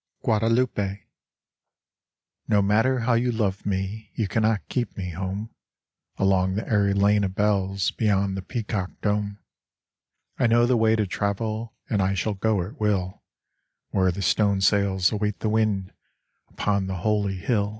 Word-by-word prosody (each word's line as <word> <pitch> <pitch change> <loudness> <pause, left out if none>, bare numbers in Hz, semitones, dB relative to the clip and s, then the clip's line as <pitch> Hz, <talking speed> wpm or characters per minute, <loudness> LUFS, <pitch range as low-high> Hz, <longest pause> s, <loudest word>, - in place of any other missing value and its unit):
Guadalupe 110 -3 +1 1.4
No 105 -2 +3
matter 115 +6 +2
how 120 +1 +2
you 120 +1 +2
love 100 -5 -1
me 100 +2 -3
You 110 - 0
cannot 110 0 0
keep 120 -5 -3
me 90 -2 -4
home. 95 +5 -4 0.7
Along 95 -1 +2
the 105 - -3
airy 100 -3 +2
lane 100 +1 +3
of 95 -1 -2
bells 100 -2 +1
Beyond 100 -3 +1
the 95 - -3
peacock 105 -2 -3
dome, 105 -1 -1 1.0
I - - +4
know 120 +1 +4
the 125 +1 +3
way 110 -1 +3
to 110 -2 +1
travel 110 +4 -3
And 105 -3 0
I 95 +1 +1
shall 105 +4 -1
go 100 -1 0
at 95 - -10
will, 100 -3 -1 0.7
Where 95 -1 +2
the 95 +3 -4
stone 100 +2 +2
sails 95 -2 +3
await 105 -1 -2
the 110 - 0
wind 105 -4 0 0.6
Upon 100 -2 -1
the 95 - -3
holy 100 +1 0
hill. 100 +1 0
100 Hz, 150 wpm, -25 LUFS, 95-110 Hz, 1.4 s, I